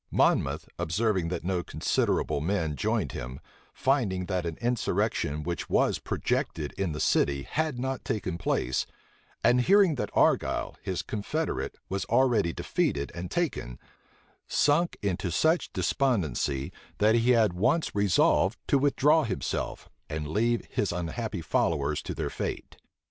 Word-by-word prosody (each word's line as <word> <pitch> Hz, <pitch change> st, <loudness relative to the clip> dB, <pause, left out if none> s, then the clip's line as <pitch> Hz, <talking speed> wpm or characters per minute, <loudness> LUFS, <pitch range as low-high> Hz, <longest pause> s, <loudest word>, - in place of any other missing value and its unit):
Monmouth, -, -, +2 dB
observing 90 Hz, +2 st, 0 dB
that 90 Hz, -, -3 dB
no 90 Hz, 0 st, 0 dB
considerable 70 Hz, -, 0 dB
men 80 Hz, -3 st, -1 dB
joined 105 Hz, -, 0 dB
him, 65 Hz, +2 st, -6 dB, 0.3 s
finding 115 Hz, -9 st, 0 dB
that 90 Hz, -2 st, -2 dB
an 80 Hz, -, -5 dB
insurrection 115 Hz, -10 st, 0 dB
which 85 Hz, +1 st, -4 dB
was -, -, +2 dB
projected 75 Hz, -3 st, -2 dB
in 95 Hz, -4 st, -2 dB
the 75 Hz, -, -4 dB
city 70 Hz, -1 st, +2 dB
had 155 Hz, -, -1 dB
not 130 Hz, +1 st, -3 dB
taken 90 Hz, -5 st, -3 dB
place, 65 Hz, -5 st, 0 dB, 0.6 s
and 125 Hz, +1 st, +5 dB
hearing 195 Hz, +4 st, +5 dB
that 135 Hz, -, -3 dB
Argyle, -, -, +2 dB
his 95 Hz, -3 st, -3 dB
confederate, 150 Hz, +10 st, -3 dB
was 95 Hz, -1 st, -2 dB
already 120 Hz, -7 st, +3 dB
defeated 70 Hz, -3 st, -1 dB
and 90 Hz, 0 st, -5 dB
taken, 135 Hz, -, -2 dB, 0.7 s
sunk 160 Hz, +4 st, +2 dB
into 95 Hz, -2 st, -1 dB
such 160 Hz, -, +2 dB
despondency, 85 Hz, -, 0 dB, 0.2 s
that 105 Hz, +2 st, +4 dB
he 115 Hz, +1 st, +3 dB
had 115 Hz, -6 st, +4 dB
once 135 Hz, -, +1 dB
resolved 100 Hz, -3 st, +3 dB
to 140 Hz, -, +3 dB
withdraw 145 Hz, +3 st, +4 dB
himself, 100 Hz, -5 st, -3 dB, 0.2 s
and 75 Hz, -1 st, -3 dB
leave 115 Hz, +8 st, +1 dB
his 100 Hz, -, -1 dB
unhappy 90 Hz, +4 st, -3 dB
followers 75 Hz, -2 st, 0 dB
to -, -, -5 dB
their -, -, -3 dB
fate. -, -, -5 dB
100 Hz, 140 wpm, -28 LUFS, 85-125 Hz, 0.7 s, and